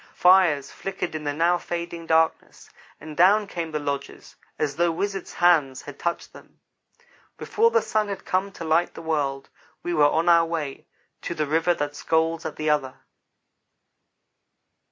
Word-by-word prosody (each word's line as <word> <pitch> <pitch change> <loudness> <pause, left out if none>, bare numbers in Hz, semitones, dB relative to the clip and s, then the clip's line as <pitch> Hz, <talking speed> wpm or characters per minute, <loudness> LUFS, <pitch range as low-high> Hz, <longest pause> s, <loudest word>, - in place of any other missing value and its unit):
Fires 180 -6 +4
flickered 190 -3 -5
in 155 -1 -5
the 145 - 0
now 170 +4 +2
fading 170 -1 -5
darkness, 160 0 0 0.3
and 155 0 -9
down 200 +6 +5
came 170 -4 -5
the 155 - -3
lodges 140 -1 -5 0.2
as 145 -2 -1
though 170 0 +3
wizard 195 +3 -3
hands 150 -7 +2
had 145 -1 -10
touched 170 0 -3
them. - - -17 0.8
Before 455 +2 +2
the 465 0 +2
sun 215 -1 0
had 200 -1 -6
come 190 +2 -1
to - - -8
light 165 +2 +1
the 165 - -9
world, 140 -4 -2 0.3
we 175 - -2
were 150 -3 +4
on 165 +3 0
our 170 -1 +6
way 155 -5 -5 0.3
to 170 - -5
"The 155 -1 -1
River 165 +4 +1
That 145 -1 -3
Scolds 160 +2 0
at - - -8
the 155 - -4
Other." 145 -4 0
165 Hz, 165 wpm, -24 LUFS, 150-175 Hz, 0.8 s, our